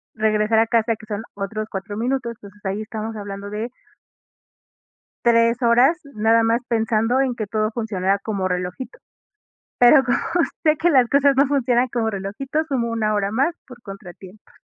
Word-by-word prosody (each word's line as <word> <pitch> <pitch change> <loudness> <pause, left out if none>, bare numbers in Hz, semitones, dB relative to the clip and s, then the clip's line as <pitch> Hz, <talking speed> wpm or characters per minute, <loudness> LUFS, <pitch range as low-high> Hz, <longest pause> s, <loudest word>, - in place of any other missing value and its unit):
regresar 215 0 +2
a 225 - +3
casa, 230 -1 +1
que - - -14
son 210 0 -4
otros 215 +2 -4
4 195 +1 -5
minutos, 245 0 -2
entonces 205 0 -14
ahí 195 +2 -2
estamos 220 +1 -6
hablando 200 -1 -7
de 215 +3 -4 1.6
3 230 +1 +3
horas, 245 +8 +4 0.2
nada 225 +2 +3
más 230 +2 +1
pensando 225 +1 +1
en 260 -3 0
que 215 - -3
todo 215 +1 -1
funcionara 200 -4 -1
como 195 -2 -2
relojito. 180 +7 -5 0.8
Pero 265 +3 +7
como 245 -2 +1 0.5
sé 310 -2 +4
que 340 +3 +2
las 255 -6 +4
cosas 280 -1 +4
no 275 0 +4
funcionan 255 -3 +1
como 230 -2 -1
relojito, 220 +10 -3
sumo 255 -6 -1
una 220 -2 0
hora 200 -1 0
más 275 +9 +1
por 250 -2 -14
contratiempos. 195 -2 -12
225 Hz, 165 wpm, -21 LUFS, 205-245 Hz, 1.6 s, Pero